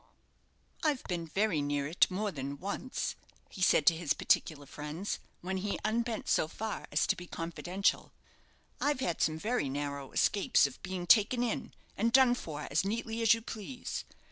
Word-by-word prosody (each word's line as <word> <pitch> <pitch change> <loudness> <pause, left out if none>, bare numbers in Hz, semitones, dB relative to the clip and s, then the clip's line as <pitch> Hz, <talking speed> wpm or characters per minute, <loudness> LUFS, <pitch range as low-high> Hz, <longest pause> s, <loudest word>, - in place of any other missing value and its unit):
"I've 300 -5 +1
been 170 -2 -3
very 190 -2 +1
near 145 0 -1
it 160 +5 +3
more 200 +3 -1
than 140 -2 -5
once," 200 - -3 0.4
he 190 - -9
said 160 -5 +4
to 165 - +6
his 160 -3 0
particular 145 -3 +1
friends, 150 +8 -5 0.2
when 190 +2 -2
he 200 +2 -2
unbent 230 +1 -1
so - - +3
far 220 +6 -5
as - - +2
to - - +2
be 180 - -9
confidential. 175 +4 -1 0.7
"I've 290 -2 +1
had 175 -8 -1
some 155 0 +2
very 215 - -1
narrow 140 -1 -4
escapes 200 -7 +3
of 140 - -5
being 185 -1 -4
taken 230 +6 +5
in 235 - -3 0.2
and 230 +3 +1
done 260 -1 +6
for 150 -10 -5
as 145 - +2
neatly 225 +3 -2
as 225 0 +6
you 230 - -8
please. 230 +3 -5
190 Hz, 170 wpm, -32 LUFS, 155-225 Hz, 0.7 s, to